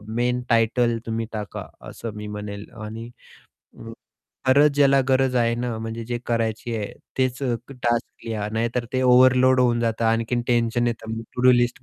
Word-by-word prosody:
main 125 +1 0
title 115 +1 +2
तुम्ही 115 0 -2
टाका, 105 -2 -6 0.2
असं 115 -3 -7
मी 105 0 -6
म्हणेल 105 0 -7 0.2
आणि 115 +2 -7 0.7
अ, 115 - -9 0.6
खरंच 145 +3 +6
ज्याला 140 -1 +5
गरज 130 -1 +2
आहे 115 -1 +2
ना, 120 -1 -3
म्हणजे 115 +1 -5
जे 120 +1 -3
करायची 115 0 -1
आहे 105 -2 -4 0.3
तेच 130 +1 0
अ, 125 -3 +1 0.2
टास्क 120 -3 -2
लिहा, 105 -2 -3
नाहीतर 115 +2 -1
ते 130 - +1
ओव्हरलोड 130 0 +5
होऊन 120 -2 +2
जातं, 115 0 -1
आणखीन 115 +2 +1
टेन्शन 120 0 +1
येतं 115 -1 -3
टू-डू-लिस्ट 125 -1 +3
120 Hz, 155 wpm, -23 LUFS, 115-125 Hz, 0.7 s, खरंच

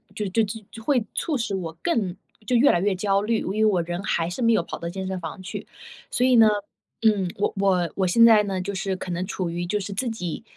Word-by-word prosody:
就 210 - -2
就 225 +5 +2
就 215 +1 -7
会 245 -2 +1
促 305 -5 -1
使 230 -4 -2
我 165 -3 -5
更 200 - 0 0.3
就 250 - +2
越 265 +4 +6
来 175 - +2
越 195 0 +1
焦 195 +1 +1
虑， 220 +1 0
因 - - -5
为 195 - -2
因 220 - +4
为 - - +5
我 175 - +2
人 175 +2 -4
还 170 -4 0
是 180 - -5
没 230 -1 +4
有 195 - +2
跑 - - -6
到 170 - -5
健 190 +1 -5
身 190 -1 -3
房 165 +2 -7
去。 185 - -7 0.4
所 250 - +2
以 255 -1 +5
呢， 225 - +8 0.6
嗯， 200 -5 +3
我 200 - 0
我 185 -4 +2
我 190 -1 +1
现 230 +6 +5
在 220 -2 +7
呢， 190 -2 -2
就 200 +2 -4
是 190 +1 -2
可 180 - -6
能 175 +2 -2
处 180 -3 -3
于 175 +1 -3
就 210 +4 -1
是 200 +1 -5
自 240 +4 -1
己， 180 -2 -5
195 Hz, 285 characters per minute, -24 LUFS, 180-225 Hz, 0.6 s, 呢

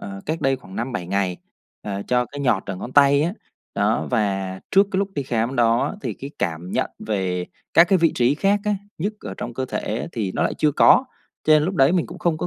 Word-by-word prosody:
ờ, 100 -1 -7
cách 160 +2 -2
đây 135 0 +2
khoảng 95 -7 -12
5-7 115 -7 -3
ngày, 95 -2 -1 0.5
ờ, 100 -1 -4
cho 125 0 +2
cái 145 - -8
nhọt 130 -3 +2
ở 100 - -4
ngón 125 +7 -7
tay 140 0 +5
á. 170 +3 0 0.4
Đó, 105 +2 +1
và 95 -5 -1
trước 195 +1 +5
cái 190 - 0
lúc 200 - 0
đi 140 - -1
khám 120 0 -1
đó 115 +5 +2
thì - - -3
cái 140 +1 -8
cảm 85 +1 -3
nhận - - 0
về 95 -4 -2 0.3
các 170 - +8
cái 190 -2 +4
vị 165 -1 +3
trí 125 +3 +3
khác 200 +6 +2
á, 210 -1 +1 0.2
nhức 205 +6 -2
ở 95 - -7
trong 120 -1 -6
cơ 130 - -2
thể 115 -1 -3
thì 105 -5 -2
nó - - 0
lại - - 0
chưa 150 -1 +1
có, 255 - +6 0.4
cho 155 - +5
nên 155 -1 +6
lúc 190 +4 -2
đấy 135 +2 +4
mình 180 -3 +1
cũng - - -10
không 165 -3 0
có - - -2
125 Hz, 245 wpm, -22 LUFS, 100-155 Hz, 0.5 s, các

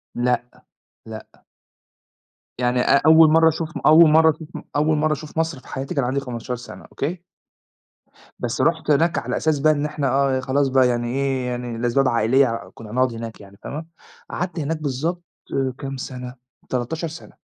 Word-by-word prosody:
لأ، 125 0 0 0.6
لأ. 110 -1 -9 1.3
يعني 125 0 +1
أ 140 - +4
أول 160 0 +7
مرّة 160 0 +6
أشوف 160 +1 -4
م - - -5
أول 155 +1 +8
مرّة 160 +1 +6
أشوف 155 +1 -11
م - - -7
أول 155 +1 +2
مرّة 155 0 +2
أشوف 155 +1 -8
مصر 160 -4 -1
في - - -19
حياتي 135 +2 -5
كان 140 - +1
عندي 130 +3 0
15 125 -1 -5
سَنة، 120 +1 -11
أوكي؟ 170 +5 -4 1.2
َبس 120 -1 -2
رُحت 160 -2 +1
هناك 165 +4 +2
على - - -2
أساس 155 -3 +1
بقى 155 +2 +4
إن 145 0 -2
إحنا 150 -2 -2
آه 135 0 +2
خلاص 135 +2 +1
بقى، 130 -1 +4
يعني 120 -1 -1
إيه، 135 0 -1
يعني 120 -1 -4
لأسباب 120 +3 +1
عائلية 115 0 +1
كنا 110 -2 -11
هنقعُد 130 0 +1
هناك 115 -1 -7
يعني، 100 0 -15
فاهمة، 155 +3 -6 0.4
قعَدت 180 -1 -4
هناك 155 +2 -2
بالضبط 155 +5 -2 0.3
آآ، 130 -2 0
كام 135 -1 -6
سَنة؟ 125 -1 -7 0.3
13 130 +7 -2
سَنة. 160 +1 -11
135 Hz, 180 wpm, -22 LUFS, 125-155 Hz, 1.3 s, أول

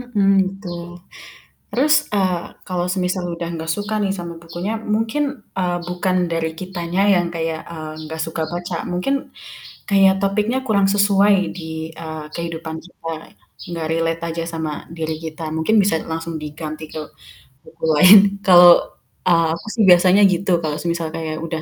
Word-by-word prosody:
Mhm, 235 -6 0 0.2
gitu. 195 0 -7 1.0
Terus, 295 +5 +3 0.2
ah, 180 -3 +1 0.3
kalau 180 -1 -1
semisal 185 -1 -1
udah 170 0 -5
gak 160 0 -4
suka 205 +1 -3
nih 195 - 0
sama 170 -1 -6
bukunya, 175 +5 -4 0.2
mungkin, 225 +7 0 0.4
eee, 175 -1 0
bukan 180 +1 -1 0.2
dari 165 -1 -1
kitanya 180 0 -2
yang 175 -1 +1
kayak, 160 -1 -2
eee, 155 -1 -7 0.2
gak 160 - -5
suka 160 0 -3
baca, 175 0 -4 0.2
mungkin 180 +10 0 0.8
kayak 195 -1 +5
topiknya 210 +5 +1
kurang 200 -2 +3
sesuai 200 0 +4 0.2
di, 160 -2 -7 0.3
eee, 155 -1 -6
kehidupan 165 -1 -5
kita, 165 -2 -9 0.7
gak 160 -1 -3
relate 165 0 -1
aja 165 0 -3
sama 160 -2 -3 0.2
diri 160 -1 -2
kita, 160 0 -6
mungkin 160 +8 +1
bisa 195 -4 +2 0.2
langsung 165 0 -4
diganti 155 +1 -6
ke 155 - -5 0.6
buku 165 0 -18
lain. 185 +7 +9 0.3
Kalau, 175 -1 +9 0.6
eee, 165 -1 +4
aku 170 - -12
sih 225 - +2
biasanya 180 +3 +6
gitu 185 +1 -1
kalau 150 -1 -1
semisal 170 -1 -1
kayak 160 -1 -4
udah 165 -1 -4
175 Hz, 155 wpm, -20 LUFS, 165-195 Hz, 1.0 s, lain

